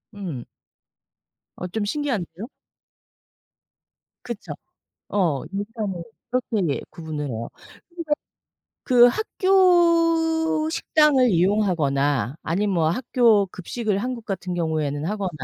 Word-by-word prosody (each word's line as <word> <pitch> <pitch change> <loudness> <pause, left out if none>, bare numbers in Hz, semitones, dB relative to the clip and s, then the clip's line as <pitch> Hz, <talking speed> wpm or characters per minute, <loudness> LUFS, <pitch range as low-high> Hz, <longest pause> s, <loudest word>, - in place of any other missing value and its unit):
음. 165 -12 -5 1.1
어 180 - -5
좀 205 +3 -3
신기한데요? 220 - -3 1.8
그쵸. 235 -4 -6 0.6
어. 170 -9 0
일단은 205 -3 -4 0.3
그렇게 210 - 0
구분을 155 -3 -5
해요. 115 -1 -4
근데 - - -34 1.3
그 245 -2 +7
학교 330 - +3
식당을 300 -6 +3
이용하거나 155 - +1
아님 200 +5 0
뭐 165 -4 +2
학교 230 -1 +3
급식을 200 +3 -3
한국 245 0 -4
같은 185 -3 -4
경우에는 155 -3 -1
하거나 200 0 -2
205 Hz, 210 characters per minute, -23 LUFS, 165-255 Hz, 1.8 s, 그